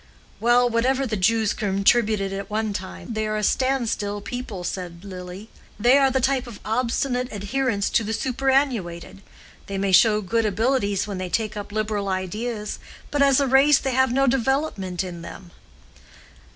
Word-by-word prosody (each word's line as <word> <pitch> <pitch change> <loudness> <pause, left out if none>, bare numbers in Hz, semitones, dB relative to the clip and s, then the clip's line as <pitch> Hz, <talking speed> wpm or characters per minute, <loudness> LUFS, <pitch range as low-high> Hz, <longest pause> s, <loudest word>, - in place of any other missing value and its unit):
"Well, 240 +2 +4
whatever 255 +3 +1
the 225 -4 -2
Jews 215 +2 +2
contributed 200 0 +1
at 195 0 -5
one 215 0 -1
time, 195 +4 -6
they 215 0 -1
are 215 0 -1
a 210 - -2
stand 260 +1 +1
still 205 -2 -2
people," 210 -3 -6
said 175 0 -6
Lily. 185 +2 -8 0.3
"They 240 +5 +5
are 270 -1 +4
the 265 - +1
type 265 0 0
of 225 -4 -10
obstinate 250 +2 0
adherence 205 +1 -1
to 230 - +2
the 215 - -3
superannuated. 250 -9 -1 0.5
They 195 - -4
may 195 0 0
show 210 +3 +5
good 225 +3 0
abilities 205 -1 0
when 200 -3 -5
they 185 -1 -4
take 215 +2 -1
up 205 -1 -6
liberal 210 -1 -2
ideas, 210 +4 -3 0.3
but 290 - 0
as 275 -1 +5
a 280 - +2
race 270 +2 +5
they 265 -1 -2
have 260 0 +3
no 270 +2 +2
development 245 - 0
in 175 -2 -7
them." 175 +1 -10
220 Hz, 170 wpm, -23 LUFS, 200-255 Hz, 0.5 s, They